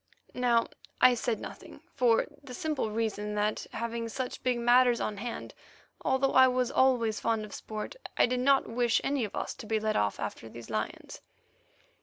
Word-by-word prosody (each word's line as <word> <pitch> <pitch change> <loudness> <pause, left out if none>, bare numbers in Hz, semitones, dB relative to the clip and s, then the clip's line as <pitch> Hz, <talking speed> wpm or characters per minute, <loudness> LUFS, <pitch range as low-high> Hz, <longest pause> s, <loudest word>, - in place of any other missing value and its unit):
Now 240 -2 +2 0.3
I 255 - +7
said 235 -1 -1
nothing, - - -10
for 245 -4 +3 0.2
the 255 -3 -9
simple 300 -7 -2
reason 210 -1 -2
that, 210 +1 -1
having 230 0 -3
such 255 +2 -4
big 250 -1 +1
matters 240 0 +4
on 210 - -2
hand, 235 +3 -6 0.5
although 265 +1 +2
I 260 0 +8
was 250 0 0
always 240 -5 +2
fond 225 -2 0
of 210 - -12
sport, 215 - -6 0.2
I - - +6
did 250 +1 -1
not 275 +2 +3
wish 240 0 +2
any 275 -4 0
of 205 - -8
us - - -3
to 230 - -10
be 220 0 +1
led 215 0 -1
off 105 -1 0
after 115 - -5
these 115 0 -10
lions. 110 0 -4
235 Hz, 180 wpm, -29 LUFS, 215-255 Hz, 0.5 s, I